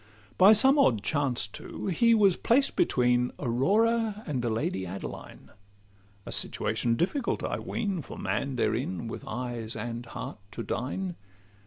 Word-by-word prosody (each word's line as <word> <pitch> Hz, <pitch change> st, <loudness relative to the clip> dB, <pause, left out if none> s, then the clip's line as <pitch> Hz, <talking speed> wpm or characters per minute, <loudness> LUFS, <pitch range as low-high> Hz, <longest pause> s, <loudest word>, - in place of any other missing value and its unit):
By 195 Hz, +3 st, +8 dB
some 265 Hz, +7 st, +6 dB
odd 115 Hz, -, +3 dB
chance 140 Hz, -8 st, +1 dB
too, 105 Hz, -, -8 dB
he 230 Hz, +5 st, +3 dB
was 200 Hz, -4 st, +5 dB
placed 270 Hz, +4 st, +2 dB
between 125 Hz, -, +2 dB
Aurora 210 Hz, -, +1 dB
and 135 Hz, -5 st, -2 dB
the 120 Hz, -, -1 dB
Lady 110 Hz, -4 st, -1 dB
Adeline— 95 Hz, +2 st, -8 dB, 0.7 s
A -, -, -7 dB
situation 115 Hz, -1 st, 0 dB
difficult, 235 Hz, -, -1 dB
I -, -, -2 dB
ween, 200 Hz, -7 st, -2 dB
For -, -, -10 dB
man 140 Hz, -1 st, -2 dB
therein, 115 Hz, -3 st, -1 dB
with -, -, -7 dB
eyes 120 Hz, -1 st, -4 dB
and 120 Hz, 0 st, -5 dB
heart, 115 Hz, -, -7 dB
to 115 Hz, -, -5 dB
dine. 175 Hz, +12 st, -3 dB
135 Hz, 145 wpm, -28 LUFS, -, 0.7 s, By